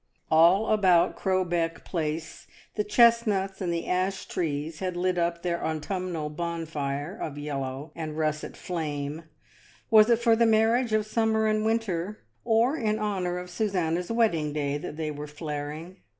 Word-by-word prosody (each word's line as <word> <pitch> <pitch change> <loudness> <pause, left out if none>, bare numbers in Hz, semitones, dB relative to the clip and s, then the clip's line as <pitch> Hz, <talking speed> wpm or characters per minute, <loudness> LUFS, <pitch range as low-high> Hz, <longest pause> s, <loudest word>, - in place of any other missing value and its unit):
All 170 +7 +5
about 185 -5 +4
Crowbeck 175 -3 -1
Place 160 -1 -4 0.3
the 210 - 0
chestnuts 210 -3 +3
and 180 -2 -1
the 170 0 -2
ash 185 +1 -1
trees 155 -1 -3
had 185 -2 -3
lit 180 0 +1
up 170 0 -1
their 170 -1 -1
autumnal 160 0 -3
bonfire 160 -1 -3
of 150 -9 -5
yellow 140 0 -4
and 155 -2 -5
russet 155 -1 -2
flame; 155 -2 -4 0.7
was 215 0 +7
it 235 - +5
for 235 -1 +3
the 230 0 +4
marriage 225 +2 +3
of 215 -1 +2
summer 220 0 +1
and 215 0 +1
winter, 215 -3 -1 0.2
or 235 +4 +3
in 215 -7 0
hon 205 -4 -1
our 175 0 -2
of 180 0 -7
Susanna's 180 -3 -1
wedding 170 -11 +1
day, 145 -1 -1
that 150 - -7
they 155 -1 -2
were 150 0 -6
flar 150 -1 -5
ing? 165 +5 -9
175 Hz, 160 wpm, -27 LUFS, 155-215 Hz, 0.7 s, was